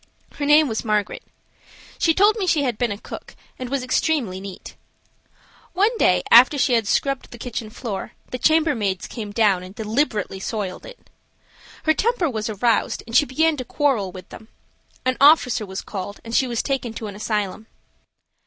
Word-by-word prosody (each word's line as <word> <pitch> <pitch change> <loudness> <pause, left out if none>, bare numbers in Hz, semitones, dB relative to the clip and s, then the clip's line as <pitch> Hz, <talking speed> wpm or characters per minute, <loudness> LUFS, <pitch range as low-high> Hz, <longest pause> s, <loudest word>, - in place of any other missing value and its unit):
Her 285 - -2
name 300 +1 +6
was 220 -3 -3
Margaret. 210 -2 -1 0.8
She 325 -2 +3
told 415 +3 +5
me 400 -4 -2
she 310 -4 +2
had 245 -5 -2
been 240 -3 0
a 200 - -4
cook, - - -10 0.2
and 255 -1 -5
was 275 -1 -2
extremely 255 - 0
neat. 195 -1 -9 1.0
One 415 +6 +2
day, 180 -1 +3
after 255 +5 +8
she 255 - +2
had 225 -3 +2
scrubbed 275 +5 0
the 240 - -11
kitchen 230 -2 -5
floor, 220 -3 -6 0.2
the 255 - -4
chambermaids 270 - +1
came 220 -4 -6
down 205 -4 +2
and 185 +2 -11
deliberately 220 -3 -1
soiled 195 -2 -4
it. - - -15 0.7
Her 315 - +3
temper 390 - 0
was 220 -1 -3
aroused 220 +2 0
and 230 0 -7
she 295 - +5
began 320 +4 +1
to 255 - -4
quarrel 250 -9 0
with 185 -1 -11
them; 220 - -12 0.6
an 255 0 +1
officer 275 -7 +5
was 190 0 -6
called 200 0 -6
and 230 - -7
she 260 - +3
was 235 -2 -2
taken 265 -5 -2
to 220 - -6
an 205 - -6
asylum. 210 0 -3
235 Hz, 180 wpm, -22 LUFS, 210-290 Hz, 1.0 s, after